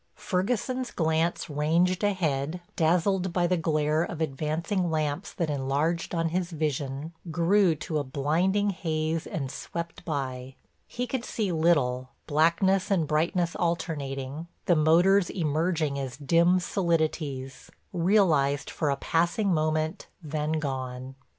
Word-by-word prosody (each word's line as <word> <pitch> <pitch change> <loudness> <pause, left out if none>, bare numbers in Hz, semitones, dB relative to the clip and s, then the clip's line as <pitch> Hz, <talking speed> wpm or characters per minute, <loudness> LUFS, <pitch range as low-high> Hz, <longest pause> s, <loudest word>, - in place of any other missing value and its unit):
Ferguson's 245 +6 -1
glance 160 +1 0
ranged 165 +5 +1
ahead, 165 -5 0 0.2
dazzled 180 +3 +2
by 175 0 +1
the 180 +1 +2
glare 155 -2 +1
of 170 -1 -3
advancing 160 +5 -1
lamps 155 +3 -1
that 165 -4 -2
enlarged 145 +6 -1
on 165 0 +1
his 175 +1 -1
vision, 150 -1 -3 0.2
grew 175 +2 +3
to 155 0 -3
a - - -1
blinding 170 +10 +1
haze 160 -3 -2
and 135 -4 -4
swept 170 0 -6
by. 130 -5 -4 0.3
He 245 - -3
could 250 -1 -3
see 210 -6 -2
little, 145 -7 +2 0.2
blackness 170 +5 +2
and 185 -6 +2
brightness 165 +3 0
alternating, 150 -3 -3 0.2
the 175 - +4
motors 175 +5 +4
emerging 155 -3 0
as 135 -2 -5
dim 170 +5 +3
solidities, 155 -7 -1 0.2
realized 165 -6 +2
for 155 - -1
a 140 - +2
passing 175 +6 +1
moment, 155 +3 0 0.2
then 155 0 -2
gone. 130 -3 -3
160 Hz, 125 wpm, -27 LUFS, 150-180 Hz, 0.3 s, the